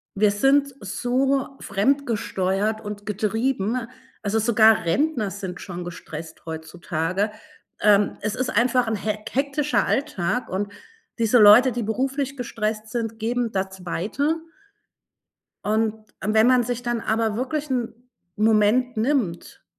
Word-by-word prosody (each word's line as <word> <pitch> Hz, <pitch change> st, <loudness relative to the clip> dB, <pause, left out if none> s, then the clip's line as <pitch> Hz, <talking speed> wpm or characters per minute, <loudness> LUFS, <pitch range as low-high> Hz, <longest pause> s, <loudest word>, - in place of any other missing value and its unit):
Wir 205 Hz, +1 st, +4 dB
sind 275 Hz, +6 st, +3 dB
so 265 Hz, +7 st, 0 dB
fremdgesteuert 215 Hz, -3 st, 0 dB
und 205 Hz, -1 st, -7 dB
getrieben, 225 Hz, +2 st, -1 dB, 0.4 s
also, 215 Hz, +1 st, +1 dB
sogar 220 Hz, -3 st, +4 dB
Rentner 245 Hz, -, +1 dB
sind 190 Hz, -2 st, -6 dB
schon 180 Hz, -2 st, -6 dB
gestresst 160 Hz, -2 st, -9 dB
heutzutage. 170 Hz, +4 st, -2 dB, 0.5 s
Ähm, 205 Hz, -1 st, +4 dB
es 210 Hz, 0 st, -2 dB
ist 255 Hz, -, -1 dB
einfach 245 Hz, +1 st, +2 dB
'n 220 Hz, -, 0 dB
hek 215 Hz, +1 st, -4 dB
hektischer 280 Hz, +2 st, +1 dB
Alltag 250 Hz, -, -1 dB
und 200 Hz, +2 st, -2 dB, 0.5 s
diese 230 Hz, +1 st, +4 dB
Leute, 220 Hz, +5 st, +8 dB
die 240 Hz, 0 st, -2 dB
beruflich 270 Hz, +5 st, -1 dB
gestresst 215 Hz, -2 st, -3 dB
sind, 225 Hz, -1 st, -3 dB
geben 235 Hz, +1 st, -1 dB
das 190 Hz, -1 st, -3 dB
weiter 265 Hz, -, -1 dB, 1.3 s
und 220 Hz, 0 st, 0 dB, 0.2 s
wenn 220 Hz, +3 st, +3 dB
man 255 Hz, -1 st, +5 dB
sich 245 Hz, 0 st, -3 dB
dann 240 Hz, -1 st, -1 dB
aber 220 Hz, -1 st, 0 dB
wirklich 280 Hz, +4 st, -2 dB
'n 245 Hz, -3 st, -1 dB, 0.4 s
Moment 220 Hz, +3 st, +3 dB
nimmt 220 Hz, -8 st, -1 dB
220 Hz, 125 wpm, -23 LUFS, 205-250 Hz, 1.3 s, Leute